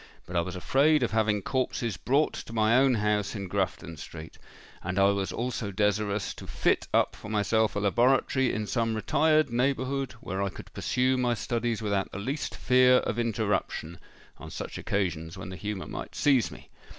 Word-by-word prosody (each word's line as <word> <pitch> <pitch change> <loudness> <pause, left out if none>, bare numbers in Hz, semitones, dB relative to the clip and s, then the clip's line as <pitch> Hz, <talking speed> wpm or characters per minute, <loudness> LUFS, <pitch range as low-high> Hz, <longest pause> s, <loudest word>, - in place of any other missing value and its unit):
But 90 - -8
I 85 - +3
was 90 +2 -5
afraid 145 +11 +3
of - - 0
having 105 -2 +1
corpses 125 -4 -1
brought 140 +9 +1
to - - -8
my 110 0 +3
own 130 -1 +5
house 105 -1 0
in 100 -2 -4
Grafton 90 -3 -2
Street; 80 +2 -10 0.4
and 90 +1 -4
I 100 0 +5
was 100 -1 -2
also 120 -3 -3
desirous 105 0 0
to - - -9
fit - - +1
up - - +2
for - - -10
myself 110 +1 +1
a - - 0
laboratory 125 +5 +2
in 110 - -2
some 115 +3 0
retired 155 +6 +2
neighbourhood, 130 +2 0
where 95 -4 -5
I 100 - 0
could - - -12
pursue 130 +1 +1
my 120 -1 +1
studies 115 -1 -2
without 100 -2 -1
the - - -6
least 135 +9 -3
fear 125 0 +5
of 120 - -1
interruption, 105 -6 -1 0.4
on - - -9
such - - -6
occasions 85 -3 -2
when 95 - -7
the 95 - -6
humour 105 -1 -4
might - - -7
seize 135 -6 +3
me. - - -13
110 Hz, 185 wpm, -28 LUFS, 100-125 Hz, 0.4 s, own